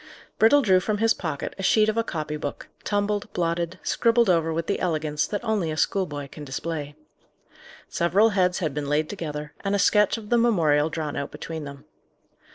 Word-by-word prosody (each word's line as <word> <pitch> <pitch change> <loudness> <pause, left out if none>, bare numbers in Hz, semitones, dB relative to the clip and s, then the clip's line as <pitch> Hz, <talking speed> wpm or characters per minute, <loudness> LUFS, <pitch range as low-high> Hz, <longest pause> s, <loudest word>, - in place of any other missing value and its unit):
Brittle 280 +6 +6
drew 185 -4 +5
from 210 +3 -1
his 225 +1 +3
pocket 155 -6 -4
a - - -2
sheet 215 +3 +4
of 215 - 0
a 230 - +1
copy 155 -7 -4
book, 145 -1 -5 0.2
tumbled, 205 0 -1
blotted, 170 +1 -1
scribbled 230 -3 +3
over 165 -2 +1
with 165 +1 -2
the 200 - -1
elegance 155 -4 -1
that 205 +2 -4
only 215 -7 0
a 155 - -4
schoolboy 150 -7 -1
can 150 - -10
display. 145 +1 -5 0.9
Several 195 +6 +3
heads 185 -3 +1
had 155 -5 -2
been 145 -1 -3
laid 150 +1 0
together, 150 -6 -6
and 200 0 0
a - - +2
sketch 210 +2 +3
of 210 -2 -10
the 240 - +4
memorial 160 -10 +3
drawn 155 -2 -4
out 140 - -3
between 160 -2 -7
them. 140 0 -10
170 Hz, 190 wpm, -25 LUFS, 150-205 Hz, 0.9 s, Brittle